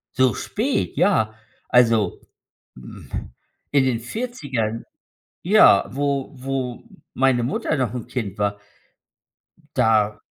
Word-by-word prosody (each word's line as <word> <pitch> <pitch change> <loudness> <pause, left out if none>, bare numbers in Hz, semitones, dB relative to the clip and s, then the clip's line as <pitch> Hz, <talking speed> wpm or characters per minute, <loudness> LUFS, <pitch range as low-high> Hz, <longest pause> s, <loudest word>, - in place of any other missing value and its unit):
So 130 -2 +4
spät, 255 +6 -1
ja. 110 - +2 0.3
Also, 115 -6 +3 0.6
hm, 60 -1 -12 0.6
in 140 -2 +4
den 120 -3 0
40ern 130 - -3 0.6
ja, 185 - +6
wo 140 0 -1
wo 130 -2 -4 0.3
meine 130 -2 +2
Mutter 140 +4 -1
noch 125 -5 -1
'n 125 - -5
Kind 105 -6 -4
war 100 0 -1 1.2
da 105 -1 +2
125 Hz, 105 wpm, -22 LUFS, 110-140 Hz, 1.2 s, ja